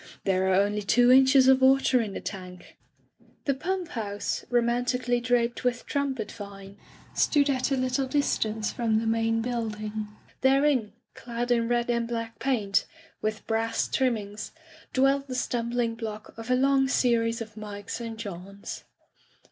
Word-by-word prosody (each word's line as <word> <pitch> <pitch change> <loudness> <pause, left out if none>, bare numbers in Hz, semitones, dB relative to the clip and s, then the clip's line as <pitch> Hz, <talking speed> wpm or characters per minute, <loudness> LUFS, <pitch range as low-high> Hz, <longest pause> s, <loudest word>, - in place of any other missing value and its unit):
"There 190 -1 +1
are 185 - +4
only 205 +2 +2
two 245 +4 +4
inches 265 0 +6
of 265 0 +6
water 265 -1 +5
in 210 -3 -4
the - - -5
tank/' 185 -2 -8 0.7
The 275 - +2
pump 355 +5 -3
house, 205 -3 -3
romantically 245 +1 +1
draped 240 -1 0
with 245 -1 -1
trumpet 270 -7 -2
vine, 200 -2 -10 0.4
stood 285 -1 +3
at 255 -1 0
a 270 - +1
little 255 +1 0
distance 220 -6 0
from 225 -2 +1
the 225 - -1
main 225 0 +1
building. 215 -3 -3 0.3
Therein, 265 -5 +3 0.2
clad 240 0 -4
in 230 -1 +2
red 240 0 +1
and 235 -1 0
black 230 -1 -4
paint, 215 -7 +1 0.3
with 215 0 -3
brass 225 0 0
trimmings, 215 -6 -2 0.4
dwelt 275 +1 +2
the 255 - -4
stumbling 240 -1 -1
block 220 -2 -7
of 225 +2 -9
a 250 - +4
long 270 +1 +3
series 230 -3 +2
of 220 -2 -7
Mikes 210 +1 -6
and 230 -1 -6
Johns. 200 -2 -7
235 Hz, 150 wpm, -27 LUFS, 215-255 Hz, 0.7 s, inches